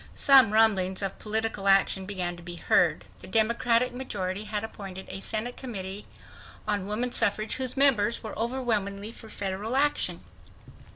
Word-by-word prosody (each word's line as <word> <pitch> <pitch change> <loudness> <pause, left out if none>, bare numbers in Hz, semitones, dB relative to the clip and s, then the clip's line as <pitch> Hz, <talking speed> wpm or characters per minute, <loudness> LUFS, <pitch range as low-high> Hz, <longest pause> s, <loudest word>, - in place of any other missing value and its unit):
Some 265 -6 +7
rumblings 200 -4 +2
of 195 - -4
political 215 -2 -2
action 195 -1 +3
began 180 -3 -3
to 175 - -13
be 175 0 -8
heard. - - +2
The - - -10
Democratic 235 +2 +2
majority 205 -6 -4
had 210 0 -3
appointed 195 -4 -8
a - - -5
Senate 220 +4 -3
Committee 200 -5 -6 0.6
on 200 -2 -1
Woman 235 +4 0
Suffrage 215 0 +2
whose 260 0 -1
members 240 -5 +3
were 220 - -6
overwhelmingly 220 -4 -2
for 225 -1 -14
federal 205 +4 -4
action. 290 +2 0
215 Hz, 150 wpm, -27 LUFS, 195-235 Hz, 0.6 s, Some